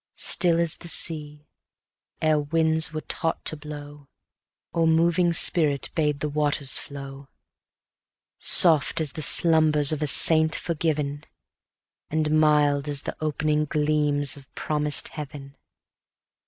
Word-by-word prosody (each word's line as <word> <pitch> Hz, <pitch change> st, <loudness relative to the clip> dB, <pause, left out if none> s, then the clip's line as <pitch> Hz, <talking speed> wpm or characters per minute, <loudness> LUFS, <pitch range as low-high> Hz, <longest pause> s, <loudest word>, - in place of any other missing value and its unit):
Still 170 Hz, -3 st, +1 dB
as 170 Hz, -2 st, -2 dB
the 170 Hz, -, -13 dB
sea, 150 Hz, -3 st, -2 dB, 0.8 s
ere 155 Hz, -1 st, +2 dB
winds 160 Hz, +1 st, 0 dB
were 155 Hz, 0 st, -6 dB
taught 165 Hz, +1 st, -3 dB
to -, -, -1 dB
blow, 145 Hz, -1 st, -11 dB, 0.7 s
Or 165 Hz, -1 st, 0 dB
moving 170 Hz, +2 st, +1 dB
spirit 155 Hz, -4 st, +3 dB
bade 150 Hz, -3 st, -2 dB
the 150 Hz, -, -2 dB
waters 145 Hz, -2 st, -1 dB
flow; 140 Hz, -1 st, -9 dB, 1.1 s
Soft 160 Hz, -4 st, +5 dB
as 155 Hz, -3 st, -3 dB
the 155 Hz, -, -8 dB
slumbers 155 Hz, -2 st, +3 dB
of 155 Hz, -1 st, -4 dB
a 150 Hz, -, -1 dB
saint 160 Hz, +2 st, +3 dB
forgiven, 150 Hz, -3 st, -4 dB, 0.8 s
And 155 Hz, 0 st, -1 dB
mild 150 Hz, -2 st, +1 dB
as 145 Hz, -1 st, -2 dB, 0.2 s
opening 150 Hz, 0 st, -2 dB
gleams 150 Hz, -1 st, -1 dB
of 135 Hz, -2 st, -18 dB
promised 150 Hz, -1 st, -1 dB
heaven. 140 Hz, -2 st, -10 dB
150 Hz, 120 wpm, -23 LUFS, 145-160 Hz, 1.1 s, Soft